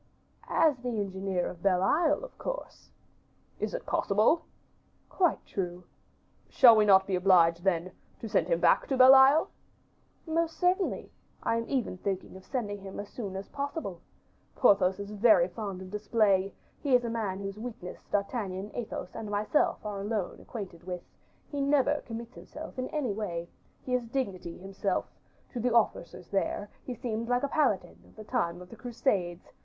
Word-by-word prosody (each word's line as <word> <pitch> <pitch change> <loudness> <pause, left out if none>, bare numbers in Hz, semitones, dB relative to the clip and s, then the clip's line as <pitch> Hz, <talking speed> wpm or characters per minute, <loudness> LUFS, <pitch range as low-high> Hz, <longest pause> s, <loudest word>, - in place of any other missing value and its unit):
"As 315 -5 +3
the 250 0 -4
engineer 190 -2 -2
of 175 - -7
Belle 185 -1 +2
Isle, 305 - +2
of - - -9
course." - - -6 0.7
"Is - - -2
it - - -5
possible?" 220 +12 +2 0.6
"Quite 355 -4 +1
true." 180 -2 -4 0.7
"Shall 240 -4 +8
we 215 -1 +4
not 190 -2 +6
be 190 - -1
obliged, 175 -2 +4
then, 185 -1 +1 0.3
to 225 - -6
send 170 -5 +1
him 170 -1 +1
back 170 -1 +4
to 265 - 0
Belle 260 +1 +9
Isle?" 270 +4 +6 0.7
"Most 330 0 -1
certainly; 365 +1 0 0.3
I 230 - +1
am 230 - -4
even 250 -9 -1
thinking 190 -1 -3
of 190 0 -13
sending 210 -6 -3
him 195 0 -8
as 205 - -6
soon 200 -6 -6
as 195 +1 -5
possible. 280 - -4 0.5
Porthos 195 -5 +4
is 200 +1 -6
very 210 -4 +5
fond 190 0 -6
of 185 - -11
display; 205 -2 +2 0.3
he 275 -4 +3
is 245 - +3
man 225 -5 -2
whose 195 +1 -6
weakness 220 -6 -7
D'Artagnan, 200 -1 -2
Athos, 215 -6 -5
and 215 -2 -5
myself 210 +5 +1
are 205 -2 -4
alone 205 -2 -3
acquainted 190 -7 -8
with; 180 -1 -5 0.5
he 285 -1 -2
never 290 +1 +2
commits 235 +1 -7
himself 265 - -9
in 255 - -2
any 275 -9 -2
way; 175 -5 -4 0.4
he 255 - -3
is 245 -2 0
dignity 195 -9 -3
himself; 195 0 -2 0.4
to 245 - -4
the 245 +2 +1
officers 180 -6 0
there, 200 +1 -1 0.2
he 250 - -2
would - - -15
seem 230 -1 -2
like 245 +1 +1
a - - +2
Paladin 275 -9 0
of - - -21
the 215 - -9
time 180 -7 -2
of 180 - -16
the - - -9
Crusades. 205 -8 -2
210 Hz, 170 wpm, -29 LUFS, 190-250 Hz, 0.7 s, Belle